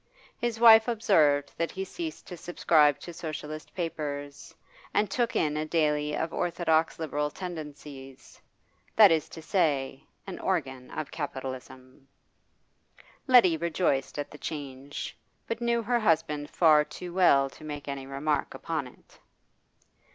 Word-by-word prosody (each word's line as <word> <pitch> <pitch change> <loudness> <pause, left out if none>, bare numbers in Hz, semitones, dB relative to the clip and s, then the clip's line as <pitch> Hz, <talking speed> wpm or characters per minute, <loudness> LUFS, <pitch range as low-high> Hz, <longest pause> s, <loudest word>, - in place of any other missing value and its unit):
His 235 -2 -2
wife 225 -1 +8
observed 160 - +3
that 170 - 0
he 190 0 -5
ceased 325 - -6
to 180 - -8
subscribe 155 -4 +3
to 175 - -8
Socialist 155 -1 -7
papers, 145 -4 -5 0.4
and 205 -2 +2
took 240 0 0
in 150 -1 +1
a 155 - -1
daily 150 -2 0
of 160 - -3
orthodox 165 -2 +1
Liberal 150 -2 -2
tendencies 150 -6 -9 0.5
that 210 -4 +8
is 160 -2 +1
to 160 - -10
say, 140 -7 0 0.2
an 190 - -7
organ 135 -9 -2
of 155 -2 -5
capitalism. 130 -2 -7 1.2
Letty 235 -11 +6
rejoiced 160 -5 -1
at 145 - -4
the 150 - -12
change, 140 -2 -6 0.3
but 230 +1 -4
knew 235 -1 +1
her 240 +2 +1
husband 155 -7 +1
far 155 -3 +5
too 175 +3 -9
well 155 -7 +5
to - - -15
make 145 -2 -7
any 135 -1 -5
remark 140 +2 -2
upon 155 -5 -3
it. 125 - -20
155 Hz, 135 wpm, -28 LUFS, 145-180 Hz, 1.2 s, wife